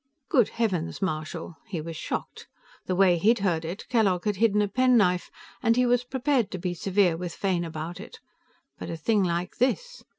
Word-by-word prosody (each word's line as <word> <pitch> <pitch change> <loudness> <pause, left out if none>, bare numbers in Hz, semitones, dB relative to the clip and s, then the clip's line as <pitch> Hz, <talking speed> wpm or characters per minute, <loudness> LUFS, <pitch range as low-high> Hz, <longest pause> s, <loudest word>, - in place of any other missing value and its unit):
"Good 245 -6 +4
heavens, 185 -8 -1
Marshal!" 160 -2 -4
He 190 -6 -4
was 165 +1 -6
shocked. - - -5 0.4
The 185 - 0
way 180 -2 +4
he'd 225 +6 +4
heard 165 -3 +1
it, 170 +5 -6
Kellogg 200 -7 +2
had 210 -2 0
hidden 210 -1 +3
a - - 0
penknife, 210 -6 +3 0.3
and 230 -3 +3
he 250 +1 +3
was 245 0 +2
prepared 260 -3 0
to - - -5
be 180 0 -3
severe 185 0 +2
with 175 0 -5
Fane 185 -3 0
about 165 +1 -6
it. - - -11 0.6
But - - -6
a 165 - -4
thing 205 +5 +2
like 175 +1 -2
this! 485 - -1
190 Hz, 190 wpm, -26 LUFS, 170-230 Hz, 0.6 s, Good